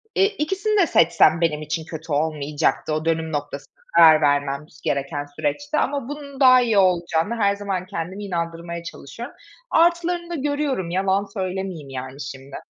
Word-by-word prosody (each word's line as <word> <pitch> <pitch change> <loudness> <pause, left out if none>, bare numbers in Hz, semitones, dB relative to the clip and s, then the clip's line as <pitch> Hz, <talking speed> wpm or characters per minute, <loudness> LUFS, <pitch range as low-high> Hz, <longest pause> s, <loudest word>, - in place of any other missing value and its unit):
eee, 390 - +5
ikisini 400 +2 -1
de 345 - +3
seçsem 165 - +4
benim 155 -3 +1
için 160 +1 -4
kötü 160 0 -8
olmayacaktı 150 0 0
o 155 +1 -2
dönüm 160 -1 0
noktasında, 145 -1 -5 0.2
karar 160 -2 +8
vermem 145 0 +1 0.2
gereken 140 +1 -2
süreçte 290 - -3
ama 280 -3 -1
bunun 285 -2 -8
daha 255 -2 +7
iyi 230 -4 +1
olacağına, 180 +1 +2
her 200 -2 +2
zaman 195 -3 -3
kendimi 190 +1 -5
inandırmaya 170 -1 -4
çalışıyorum. 230 - -9 0.4
Artılarını 345 +1 +2
da 345 - -3
görüyorum, 285 - -1
yalan 190 +2 +1
söylemeyeyim 185 -6 -4
yani 130 +1 -7
şimdi. 135 0 -8
170 Hz, 150 wpm, -22 LUFS, 155-255 Hz, 0.4 s, karar